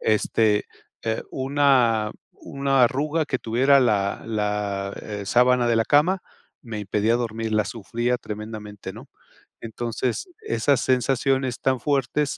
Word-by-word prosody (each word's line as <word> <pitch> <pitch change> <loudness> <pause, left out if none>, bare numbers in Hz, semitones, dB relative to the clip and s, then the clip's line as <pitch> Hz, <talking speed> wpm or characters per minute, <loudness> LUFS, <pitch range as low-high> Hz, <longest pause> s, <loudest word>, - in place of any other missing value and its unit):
este, 110 -1 +2 0.4
eh, 110 0 -1
una 130 -5 +2 0.4
una 135 -1 +1
arruga 150 +6 0
que 130 - -1
tuviera 125 +5 +3
la 105 -5 +1
la, 105 -2 -2
eh, 105 -2 -6
sábana 125 +2 +3
de 115 - +3
la 115 - +2
cama 175 +9 +3 0.4
me 115 -5 -6
impedía 105 +3 +1
dormir, 115 -2 -3
la 110 -1 +2
sufría 120 +4 -2
tremendamente, 105 -2 -7
¿no? - - -12 0.5
Entonces 120 - -3
esas 145 - +1
sensaciones 130 0 +1
tan 130 -1 +1
fuertes, 140 +1 0
120 Hz, 125 wpm, -24 LUFS, 110-135 Hz, 0.5 s, tuviera